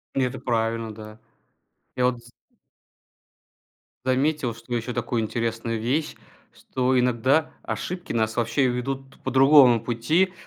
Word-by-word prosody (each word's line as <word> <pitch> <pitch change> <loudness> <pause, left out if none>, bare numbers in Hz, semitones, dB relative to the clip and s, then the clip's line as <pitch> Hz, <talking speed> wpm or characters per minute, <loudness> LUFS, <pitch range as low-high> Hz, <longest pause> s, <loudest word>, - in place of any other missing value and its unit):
И 135 - +2
это 130 0 -1
правильно, 115 -2 -1
да. 110 +1 -11 0.8
Я 125 -1 +1
вот 120 -2 -1
з 120 - -17 1.7
заметил, 130 -1 +1
что 115 +2 -6
еще 120 +1 -3
такую 120 -1 -1
интересную 115 0 -2
вещь, 140 +8 -1 0.4
что 130 0 0
иногда 125 +5 +2
ошибки 180 0 -5
нас 110 -1 0
вообще 125 +3 +1
ведут 135 +2 -4
по 130 - -2
другому 135 -2 +7
пути. 155 +11 +1
125 Hz, 125 wpm, -24 LUFS, 115-135 Hz, 1.7 s, другому